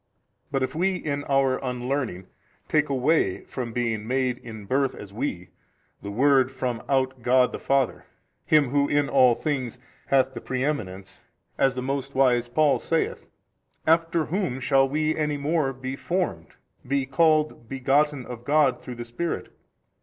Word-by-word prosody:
But 135 -2 0
if 130 - -2
we 185 +4 +1
in 145 -5 -3
our 135 -2 +2
unlearning 125 -6 -2 0.4
take 150 -1 +2
away 135 - +1
from 125 -3 -5
being 115 -3 -2
MADE 130 -1 0
in 110 -3 -9
birth 135 +4 0
as 100 -1 -10
we 95 -6 -4 0.5
the 100 - -6
Word 130 +4 +3
from 125 -3 -3
out 130 -2 +1
God 125 +1 +3
the - - -6
Father, 135 -2 0 0.4
Him 150 -4 +3
who 140 +1 +2
in 145 -1 +2
all 130 -3 +5
things 130 -5 -3 0.3
hath 135 -1 +3
the 120 - -7
preeminence, 125 -9 -3 0.3
as 135 -1 +2
the 125 - -3
most 135 +1 -3
wise 125 -3 +3
Paul 145 +4 +2
saith; 165 -1 -1 0.6
after 165 0 +2
whom 165 -7 -2
shall 135 +1 +3
WE 155 +2 0
any 150 -1 -1
more 145 -1 0 0.3
formed, 170 - -2 0.4
be 140 0 +1
called 155 -3 +2
begotten 135 +1 +1
of 120 -1 -8
God 145 -2 +2
through 125 - -7
the 120 0 -6
Spirit? 140 +9 -4
135 Hz, 155 wpm, -25 LUFS, 125-145 Hz, 0.6 s, all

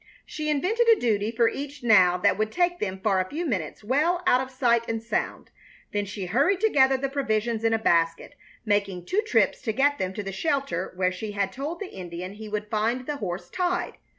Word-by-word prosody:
She 305 -1 -4
invented 400 +11 +1
a 455 -2 +6
duty 215 -3 +1
for 230 0 +2
each 285 +2 -5
now 185 -6 +5
that 200 +3 +3
would 215 0 -1
take 350 +2 +1
them 190 -1 -3
for 195 -3 +2
a 185 0 -2
few 335 +4 -3
minutes 190 - -3
well 310 +10 +1
out 255 -8 +4
of 260 - -5
sight 245 -3 +2
and 225 0 -1
sound; 230 - -3 0.4
then 205 0 -1
she 200 -1 -5
hurried 280 - +2
together 270 -11 +4
the 275 +1 -1
provisions 230 -5 -1
in 225 - +3
a 225 - +3
basket, 165 -1 +1 0.3
making 200 -4 0
two 405 - +1
trips 440 - +1
to 220 - -1
get 285 +5 +2
them 185 -1 -1
to 205 - -4
the 195 - -5
shelter 275 - -1
where 185 0 +1
she 205 +3 -6
had 200 -1 -1
told 290 - -5
the 405 -3 -7
Indian 180 +1 -7
he 215 +1 -9
would 210 0 -3
find 225 +4 -1
the 295 +1 -3
horse 185 -6 -5
tied. 360 -1 -2
225 Hz, 215 wpm, -26 LUFS, 200-285 Hz, 0.4 s, a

